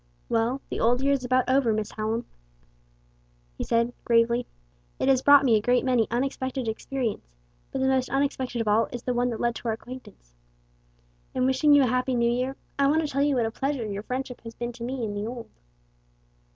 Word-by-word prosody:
"Well, 230 +4 0
the - - -3
old 245 +3 +2
year 280 0 +3
is 270 -2 -1
about 255 0 +1
over, 260 -3 +3
Miss 215 0 -2
Hallam," 220 +2 -2 1.3
he - - -4
said, 235 +1 +1
gravely. 235 +1 +2 0.5
"It - - -1
has 260 -1 +4
brought 285 0 +7
me 235 -4 +5
a 215 - +2
great 245 +3 +2
many 245 -4 +2
unexpected 260 +1 -2
experiences, 220 - -4 0.4
but 270 - -3
the 265 - +2
most 260 -1 +1
unexpected 265 -3 -1
of 225 - -3
all 210 +2 +3
is 245 -1 -7
the 250 - -1
one 245 +1 +1
that 230 - -4
led 240 0 +1
to - - -7
our 220 - +1
acquaintance. 225 - -12 1.0
In 255 -1 +1
wishing 265 +3 +4
you 285 - +6
a - - +4
happy 255 +1 0
new 235 0 +2
year, 255 +2 -1 0.2
I 275 - +4
want 310 +3 +3
to - - -1
tell 280 -1 -1
you 285 -1 +2
what 240 -3 +2
a 225 - -2
pleasure 270 -1 -2
your 200 -1 -4
friendship 255 +2 -5
has 230 0 -10
been 240 0 -4
to 235 0 -9
me 250 -1 -3
in 205 - -4
the 205 +1 -3
old." 235 -1 -7
245 Hz, 215 wpm, -26 LUFS, 230-265 Hz, 1.3 s, brought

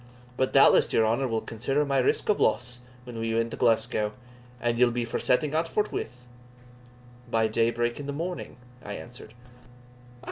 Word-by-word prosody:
But 130 +1 0
doubtless - - +5
your 110 - +3
honour 120 +5 +1
will 115 -2 -1
consider 135 +6 -1
my 140 -1 +1
risk 125 - +1
of 210 - +2
loss 125 +3 +1 0.2
when 120 -2 -8
we 115 0 -1
win 115 0 0
to - - -4
Glasgow 110 -3 +1 0.5
and 120 0 -1
ye'll 125 -1 +6
be 120 0 -2
for 115 - -3
setting 145 +4 +1
out 160 +1 +1
forthwith?" 125 -11 -3 1.0
"By 115 -1 +2
day 115 +1 +2
break 120 +1 -1
in 145 - -6
the - - -2
morning," 170 +2 -5 0.3
I 100 - -6
answered. 120 0 -10
120 Hz, 175 wpm, -27 LUFS, 115-135 Hz, 1.0 s, ye'll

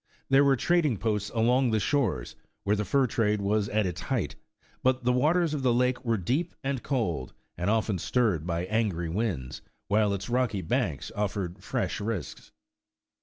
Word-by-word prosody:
There 135 +1 +6
were 140 -1 +5
trading 155 -2 +2
posts 105 -1 -1
along 120 +3 +2
the 110 -1 +2
shores, 105 - 0 0.3
where 100 +1 +2
the 105 0 -2
fur 135 +3 +3
trade 105 -3 +1
was 100 +1 0
at 105 0 +1
its 90 -1 -3
height, 125 -8 -2 0.5
but 130 0 +2
the 125 +1 +3
waters 160 +5 +2
of 145 - -2
the 130 -2 +3
lake 125 0 +1
were 115 -2 +1
deep 135 - -1
and 135 -2 -1
cold, 90 - -2 0.2
and 90 +3 -1
often 110 -3 +1
stirred 100 -8 +1
by 85 0 -1
angry 95 -5 0
winds, 85 - -2 0.3
while 105 0 +3
its 95 - -6
rocky 120 -6 0
banks 80 - -1
offered 100 -3 -3
fresh 125 +1 -2
risks. 105 -3 -4
110 Hz, 170 wpm, -28 LUFS, 100-125 Hz, 0.5 s, There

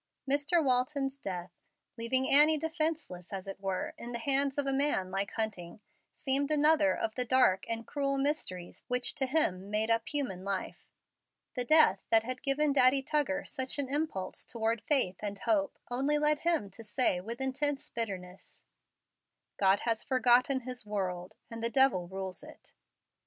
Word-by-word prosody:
Mr. 290 +5 +2
Walton's 270 +1 0
death, 180 -5 -6 0.4
leaving 255 +3 0
Annie 300 +2 +6
defenceless, 315 - -3
as 195 -2 -5
it 195 - -7
were, 195 -1 -3
in 240 +1 -7
the - - -2
hands 275 +2 +1
of 285 - 0
a 275 - -1
man 270 -10 0
like 195 +1 -2
Hunting, 210 -4 -4 0.3
seemed 280 0 -1
another 300 0 +4
of 220 - -2
the 250 - -1
dark 250 -7 +2
and 230 0 -3
cruel 275 -1 -2
mysteries 270 - -3
which 250 0 +1
to 270 -3 -2
him 200 - +1
made 215 +2 0
up 230 0 0
human 255 -12 -3
life. 195 -1 -4 0.7
The 250 -2 -1
death 310 -10 +5
that 225 -1 +5
had 255 +2 -4
given 285 +1 +1
Daddy 270 0 +5
Tuggar 290 0 -1
such 260 +1 -2
an 280 -2 +1
impulse 290 -11 -2
toward 225 -1 -2
faith 255 -11 +1
and 205 -1 -3
hope 295 - 0
only 275 +4 +1
led 300 0 +2
him 325 - +1
to 225 - -10
say 210 -4 +1
with 230 +5 -7
intense 275 +2 -1
bitterness, 190 -5 -5 0.9
"God 195 0 +3
has 230 -2 -1
forgotten 255 +1 +3
His 250 -1 -6
world, 185 -4 -4 0.2
and 230 0 -7
the 230 - +2
devil 265 -9 +2
rules 190 0 -6
it." - - -15
255 Hz, 165 wpm, -30 LUFS, 200-285 Hz, 0.9 s, Annie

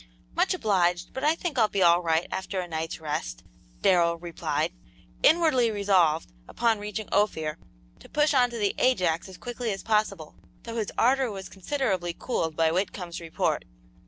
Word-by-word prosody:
"Much - - +2
obliged, 175 -4 +1
but 265 - -5
I 305 +2 +4
think 330 -6 -3
I'll 220 - +5
be 200 -2 0
all 170 0 +5
right 165 0 +1
after 190 0 -3
a 180 - -3
night's 160 0 -4
rest," - - -4 0.4
Darrell 170 -2 +4
replied, 165 -2 -2 0.5
inwardly 310 -8 +4
resolved, 190 - +2 0.2
upon 230 -2 +1
reaching 210 +1 -5
Ophir, 160 -7 +1 0.4
to - - -15
push 300 0 +2
on 250 -2 +4
to 240 - -6
the 205 -3 +1
Ajax 185 -8 +2
as 185 - -11
quickly 240 -1 -4
as 195 - -5
possible, 210 -7 0 0.3
though 230 0 -6
his 215 -3 -2
ardor 260 +1 +3
was 195 -2 -7
considerably 190 -5 -2
cooled 160 -10 -2
by 160 0 +3
Whitcomb's 180 -1 -3
report. 165 -1 -1
190 Hz, 165 wpm, -27 LUFS, 170-230 Hz, 0.5 s, I'll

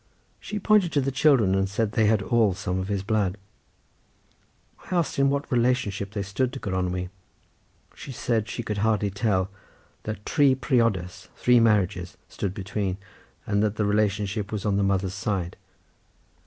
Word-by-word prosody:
She 210 - -5
pointed 210 -4 +3
to 145 - +3
the 135 +1 -1
children 130 -8 +4
and 95 0 +1
said 105 +1 -1
they 110 -2 +2
had 105 -2 +2
all 110 -4 +2
some 95 -2 -2
of 95 - -3
his 100 -2 -2
blood. 100 -2 0 1.5
I 185 - -1
asked 170 -5 0
in 140 0 +4
what 140 0 -2
relationship 120 -5 +1
they 100 - -2
stood 105 +6 -1
to 135 - -5
Gronwy. 90 -3 -2 0.8
She 140 - -9
said 115 -3 -1
she 120 - -4
could 105 -2 -3
hardly 105 -1 +1
tell, 95 -2 0 0.5
that 105 -1 -6
tri 140 -4 +4
priodas 115 - 0
three 125 -1 +4
marriages 100 -6 +1
stood 95 -1 -4
between, 95 -1 -3 0.5
and 105 -1 +1
that 105 0 +1
the 105 - 0
relationship 105 0 0
was 105 -2 -3
on 100 -2 +1
the - - +2
mother's 95 -1 0
side. 95 -4 -2
105 Hz, 165 wpm, -25 LUFS, 95-120 Hz, 1.5 s, children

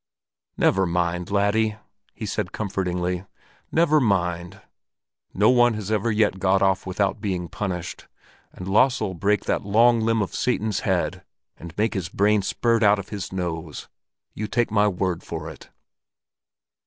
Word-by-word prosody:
"Never 95 -1 +3
mind, 85 +1 -1
laddie!" 105 +2 +1 0.4
he - - -6
said - - -3
comfortingly. 90 -3 -2 0.5
"Never 160 -2 +4
mind! 90 -7 -1 0.7
No 105 +5 +4
one 120 -2 +4
has 105 -1 -5
ever 110 +2 +1
yet 105 -3 +1
got 95 0 +2
off 95 -1 +1
without 100 +3 -1
being 90 -5 -2
punished, 90 -1 -5 0.4
and 90 - -9
Lasse'll 105 0 +2
break 100 +4 0
that - - 0
long 115 +4 +4
limb 110 -1 +1
of 95 - -6
Satan's 110 -4 0
head - - -1 0.3
and 85 0 -11
make 110 +2 +1
his 95 -6 -3
brains 100 +1 +2
spurt 115 -1 +1
out 105 -1 +5
of 100 - -7
his 100 -3 -5
nose; 85 -5 -5 0.4
you 110 - -4
take 120 0 0
my 105 -1 +3
word 90 -3 -1
for 80 -1 -6
it!" 75 - -14
100 Hz, 150 wpm, -24 LUFS, 90-110 Hz, 0.7 s, out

